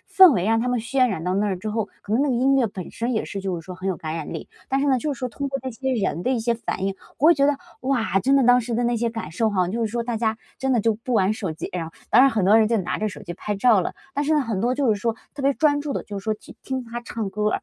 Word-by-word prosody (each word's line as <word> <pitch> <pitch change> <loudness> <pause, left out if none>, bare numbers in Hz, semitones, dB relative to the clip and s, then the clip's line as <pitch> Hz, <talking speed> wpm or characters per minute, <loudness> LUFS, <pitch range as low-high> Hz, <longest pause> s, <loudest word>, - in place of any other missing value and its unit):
氛 375 -5 +8
围 185 -3 0
让 225 0 +3
他 235 - -1
们 245 -1 0
渲 255 +3 +2
染 190 -8 -3
到 180 +2 -1
那 200 -1 +1
之 215 +4 -5
后 215 0 -2
可 210 - -3
能 260 - +3
那 290 - +1
个 250 - +1
音 270 +3 +3
乐 255 - +3
本 190 -3 -7
身 235 +2 -2
也 220 - 0
是 195 -1 -5
就 190 -2 -2
是 - - -15
说 185 +2 -8
很 185 +1 -7
有 190 -2 -1
感 155 0 -4
染 160 0 -5
力， 160 - -6 0.2
但 270 - +2
是 285 - +1
呢， 265 -2 +3
就 295 +3 -2
是 250 - -8
说 255 - -2
通 280 +4 -4
过 275 - -2
这 260 - -4
些 265 +3 -2
人 195 -7 -1
的 255 - 0
一 250 -3 +1
些 235 +1 +1
反 195 -4 -4
应， 195 - -1 0.2
我 300 - +4
会 340 - +8
觉 280 - +2
得， 285 -1 +2 0.2
哇， 245 -7 +1
真 270 +7 +2
的 275 - +5
当 245 +1 +6
时 235 - -5
的 240 - +1
那 240 0 +1
些 235 +1 0
感 225 -8 -6
受 220 +5 +1
哈， 185 -3 +1
就 230 +5 -2
是 - - +1
说 235 0 -1
大 235 -1 -2
家 220 -1 0 0.2
真 265 0 0
的 240 - +3
就 225 +1 +2
不 240 +4 -5
玩 205 -2 +3
手 195 -6 -3
机， 155 - -6
然 175 -2 -2
后 160 - -9 0.2
当 245 - +7
然 270 - +6
很 215 -6 0
多 205 +4 +6
人 220 - +5
就 230 - +2
拿 185 - -2
着 215 - 0
手 200 - -9
机 175 -3 -6
拍 210 +3 -3
照 220 -1 +5
了， 175 - -3 0.2
但 285 +1 0
是 310 - +1
呢， 300 - +3
很 225 -7 -2
多 240 +4 +1
就 260 -5 +2
是 205 - -5
说， 230 0 0 0.2
特 280 - -6
别 275 - +3
专 290 -2 +2
注 290 -1 -3
地 - - -2
就 205 - -7
是 - - -9
说， 220 - +1
去 210 - -15
听 260 -1 -3
他 235 +1 -6
唱 230 -3 -4
歌 210 +2 0
儿。 - - -2
230 Hz, 370 characters per minute, -23 LUFS, 200-260 Hz, 0.2 s, 氛